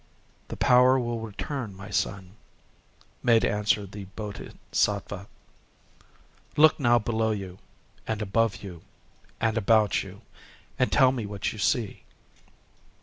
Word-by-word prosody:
"The - - -7
power 125 +1 +5
will 120 -1 -2
return, 115 +1 -5
my 100 +2 -10
son," 95 -2 -2 0.9
made 115 -2 +4
answer 105 0 +1
the 100 +1 -9
Bodhisattva…. 100 0 -3 1.3
"Look 155 +1 +6
now 120 -3 +4
below 110 0 0
you 95 -3 -4 0.5
and 110 -1 -2
above 105 -1 0
you 90 -4 -9 0.6
and 115 0 +1
about 110 -2 +3
you, - - -10 0.6
and 130 - +2
tell 130 -2 +5
me 120 -5 -4
what 100 -1 -3
you 110 - -9
see." 105 +3 0
110 Hz, 120 wpm, -26 LUFS, 100-120 Hz, 1.3 s, Look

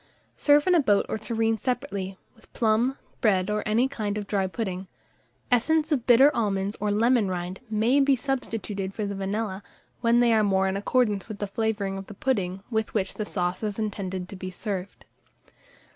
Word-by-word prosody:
Serve 290 0 +4
in 365 - +4
a 345 - +6
boat 205 -8 +3
or - - -1
tureen 225 0 0
separately, 195 -6 -3 0.2
with 225 - -22
plum, 235 +4 +2 0.2
bread, 195 -3 +2
or 210 0 0
any 230 +5 +3
kind 215 -6 -3
of 205 - -3
dry 195 -1 0
pudding. 190 -2 -4 0.6
Essence 310 +6 +2
of 265 -6 0
bitter 265 +4 +6
almonds 200 -2 0
or 210 - 0
lemon 225 0 +3
rind 180 0 -4
may 225 +6 +3
be 275 -1 +4
substituted 225 -7 -3
for 215 - -2
the 200 - -3
vanilla, 195 0 -3 0.4
when 235 0 +3
they 240 -1 +4
are 220 -1 +4
more 190 -1 +2
in 190 - -1
accordance 205 -1 +1
with 215 -2 -6
the 205 - -2
flavouring 200 -2 -2
of 195 - -9
the 205 - -10
pudding 195 -6 -1
with 220 -1 -1
which 190 -3 0
the 215 - -4
sauce 180 -1 -2
is 210 -2 -3
intended 190 -4 -3
to 195 - -9
be 185 0 -6
served. 190 0 -5
210 Hz, 190 wpm, -26 LUFS, 195-235 Hz, 0.6 s, a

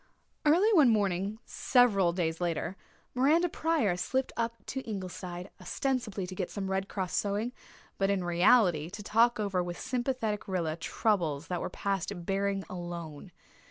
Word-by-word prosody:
Early 375 +9 +5
one 300 -9 +7
morning, 200 -1 +1
several 205 -9 +3
days 165 -1 -2
later, 175 +2 -1 0.4
Miranda 300 +7 +4
Pryor 310 - +1
slipped 260 +8 -1
up 230 0 -1
to 265 - -4
Ingleside, 185 -4 -6
ostensibly 215 -1 -2
to 185 - -7
get 185 -1 -3
some 195 -2 -4
Red 190 +1 -1
Cross 185 -3 -3
sewing, 210 +4 0 0.5
but 195 0 +2
in 195 -2 +1
reality 175 -2 +4
to 205 +3 -8
talk 230 +3 +3
over 195 -3 0
with 175 0 -5
sympathetic 245 -4 -2
Rilla 170 -5 -1
troubles 165 -4 0
that 180 -2 -2
were - - -3
past 195 -2 -2
bearing 195 0 0
alone. 175 -2 -7
195 Hz, 150 wpm, -30 LUFS, 175-235 Hz, 0.5 s, one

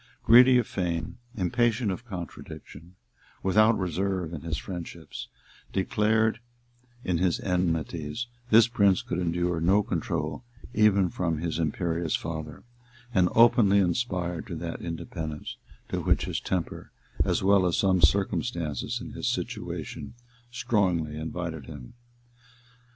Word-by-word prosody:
Greedy 125 +2 +8
of 120 - +2
fame, 85 -3 -3 0.2
impatient 115 +3 +1
of 100 +6 -6
contradiction, 85 -2 -9 0.5
without 110 +4 +4
reserve 90 -1 -2
in 75 - -5
his 80 -1 -3
friendships, 90 -3 -7 0.4
declared 110 +3 +1 0.6
in 90 -3 0
his 90 -1 +1
enmities, 85 +1 -1 0.2
this 115 0 +7
prince 100 -5 +3
could 85 - -3
endure 85 -1 0
no 95 +5 +4
control 75 +1 -3 0.3
even 100 -3 +4
from 85 -3 -1
his 80 +1 -3
imperious 85 0 -1
father, 80 -2 -5 0.5
and 90 -4 +4
openly 115 -4 +6
aspired 90 -3 -1
to - - -5
that - - -5
independence, 80 -2 -5 0.3
to - - -2
which - - +2
his - - -2
temper, 90 -3 -4 0.3
as - - 0
well 95 -1 +4
as 85 - 0
some 95 -2 +3
circumstances 85 - +1
in - - -8
his - - -4
situation, - - -5 0.3
strongly 100 -11 0
invited 80 -2 -5
him. 70 -6 -10
90 Hz, 125 wpm, -27 LUFS, 80-105 Hz, 0.6 s, Greedy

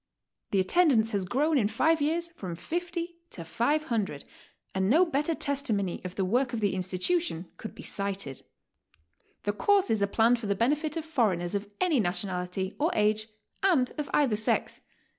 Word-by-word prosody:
The 195 - +1
attendance 225 - +3
has 200 -3 0
grown 285 - +2
in 210 - +2
five 320 +8 +2
years 335 +3 0
from 185 - -6
50 340 - -4
to 170 - -8
500, 230 - -1 0.5
and 190 0 +1
no 325 +9 +5
better 315 0 0
testimony 230 - -1
of 185 0 -6
the 190 - 0
work 245 +6 +1
of 230 - -1
the 205 -2 +1
institution 185 - -1
could 220 - -8
be - - -10
cited. 200 -9 -3 1.0
The 205 - 0
courses 300 - +2
are 200 - +3
planned 230 +4 +3
for 225 - -5
the 200 - +1
benefit 295 - 0
of 320 - -4
foreigners 210 - 0
of 200 0 -3
any 340 -7 +3
nationality 180 0 -2
or 310 +3 +2
age 215 +1 +2 0.3
and 335 -11 +3
of 295 - -3
either 270 -7 +3
sex. 215 - 0
225 Hz, 165 wpm, -28 LUFS, 195-305 Hz, 1.0 s, no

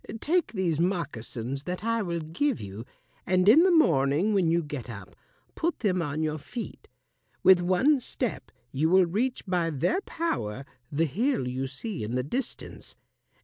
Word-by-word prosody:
Take 340 +2 0
these 175 -6 0
moccasins 140 - -2
that 180 +2 -4
I 230 0 +1
will 170 -4 -2
give 205 - -1
you, 100 +4 -8 0.4
and 185 +1 +2
in 250 +10 +8
the 375 - +5
morning 165 - +3
when 185 -5 +3
you 170 +1 +2
get 145 -4 -6
up 100 -5 -9 0.4
put 335 +1 -2
them 185 -5 +1
on 155 0 -2
your 155 0 -2
feet. 225 - -8 0.6
With 185 -2 +7
one 190 +12 +3
step 250 0 -4 0.2
you 150 +4 +1
will 185 +1 +6
reach 230 +9 -1
by 180 -3 0
their 165 - 0
power 135 - -3 0.3
the 155 +3 +1
hill 205 - 0
you 130 +2 -2
see 155 - -5
in 110 +3 -3
the 125 - 0
distance. 245 - -6
175 Hz, 165 wpm, -27 LUFS, 140-225 Hz, 0.6 s, in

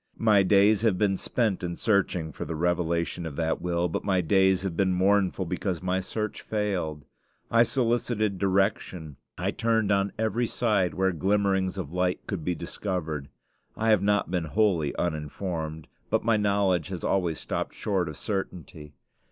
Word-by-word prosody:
My 105 -3 +4
days 100 +2 +4
have 110 -5 +2
been 95 0 +2
spent 110 -1 0
in 85 -1 -3
searching 90 -7 +1
for - - -6
the 80 - -4
revelation 85 +1 0
of 75 - -7
that 80 0 -1
will; 85 0 0
but 80 - -3
my 95 -2 +2
days 95 +2 +3
have 95 -4 -3
been 95 0 +2
mournful, 95 0 +2
because 90 +1 -3
my 95 +1 +1
search 105 +3 -4
failed. 90 -9 -2 0.5
I 115 - +5
solicited 115 -5 +1
direction; 95 -6 0 0.2
I - - -1
turned 115 -3 +1
on 100 0 +2
every 110 +2 0
side 105 -8 +1
where 95 0 +2
glimmerings 95 +2 +1
of 85 -4 -5
light 90 0 0
could 95 -6 -4
be 90 +2 -1
discovered. 80 -8 -4 0.5
I 110 +1 +1
have 105 -4 +4
not 105 -2 +1
been 90 -3 0
wholly 85 -4 +1
uninformed; 80 0 -3 0.2
but - - +1
my 115 -1 +4
knowledge 100 -5 +1
has 95 -3 -6
always 90 -5 0
stopped - - -4
short 95 -5 -1
of 75 - -8
certainty. 85 -7 -5
95 Hz, 165 wpm, -27 LUFS, 85-105 Hz, 0.5 s, I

